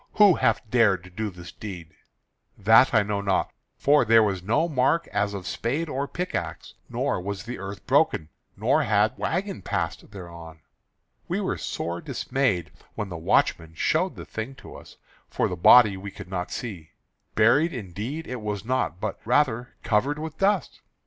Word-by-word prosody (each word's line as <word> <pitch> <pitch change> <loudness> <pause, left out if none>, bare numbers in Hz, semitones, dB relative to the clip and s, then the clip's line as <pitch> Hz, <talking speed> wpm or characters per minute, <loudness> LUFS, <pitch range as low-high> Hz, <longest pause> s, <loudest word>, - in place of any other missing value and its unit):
Who 205 -3 +7
hath 110 -7 +1
dared 105 -7 +3
to 90 - -14
do 110 +4 -3
this 90 -2 -11
deed?" 90 -6 -8 0.7
"That 110 +5 +6
I 105 - +4
know 100 0 -2
not, 100 -2 0 0.2
for 145 0 +4
there 115 -1 +6
was 95 -3 -1
no 115 - +1
mark 150 +2 +2
as 105 0 -1
of 95 -2 -6
spade 145 +8 -2
or 140 +1 -2
pick 180 +4 -4
axe; - - -4 0.2
nor - - -1
was 100 +1 -5
the 120 +2 -6
earth 100 +1 -7
broken, 80 - +2 0.3
nor - - +2
had - - +2
wagon - - -2
passed - - -3
thereon. 85 -5 -10 0.7
We - - -1
were - - -1
sore 85 +1 -4
dismayed 125 - -1 0.2
when 105 -2 -4
the 90 - -6
watchman 80 0 +1
showed - - +1
the - - -9
thing 115 +5 -6
to - - -12
us; - - -13 0.3
for - - 0
the 90 - -3
body 105 +3 +7
we 100 +1 -7
could 95 - -11
not 90 -1 -3
see. 95 -10 -7 0.4
Buried 130 +10 +4
indeed 115 - -5
it 125 -3 -6
was 105 -2 -4
not, 110 - -1
but 105 -1 -4
rather 125 -1 +1
covered 120 +6 +1
with 155 0 -7
dust. 195 -2 +1
105 Hz, 175 wpm, -25 LUFS, 95-130 Hz, 0.7 s, Who